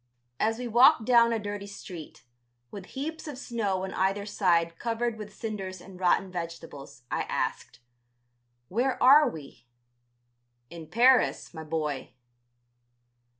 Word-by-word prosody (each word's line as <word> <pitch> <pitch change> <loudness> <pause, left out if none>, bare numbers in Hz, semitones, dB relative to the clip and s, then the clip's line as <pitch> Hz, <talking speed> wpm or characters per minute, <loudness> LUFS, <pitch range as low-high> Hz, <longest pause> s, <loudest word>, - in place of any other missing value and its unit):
As 225 +1 +1
we 250 0 -4
walked 240 +2 +5
down 235 -1 +5
a 230 - +1
dirty 205 -1 -5
street, 180 -5 -10 0.5
with 195 -2 -9
heaps 315 +4 -5
of 290 -4 -6
snow 210 -8 -2
on 190 - -5
either 195 +2 0
side 170 -5 +1
covered 235 0 -1
with 210 -1 -9
cinders 195 -4 -5
and 185 0 -13
rotten 185 +1 +2
vegetables, 165 -7 -8
I - - 0
asked: 115 - -3 0.9
"Where 245 - 0
are 280 +2 +7
we?" 135 - -12 1.0
"In 165 -2 -9
Paris, 250 +1 +3
my 160 -1 -7
boy." 150 -5 -4
200 Hz, 130 wpm, -28 LUFS, 170-235 Hz, 1.0 s, are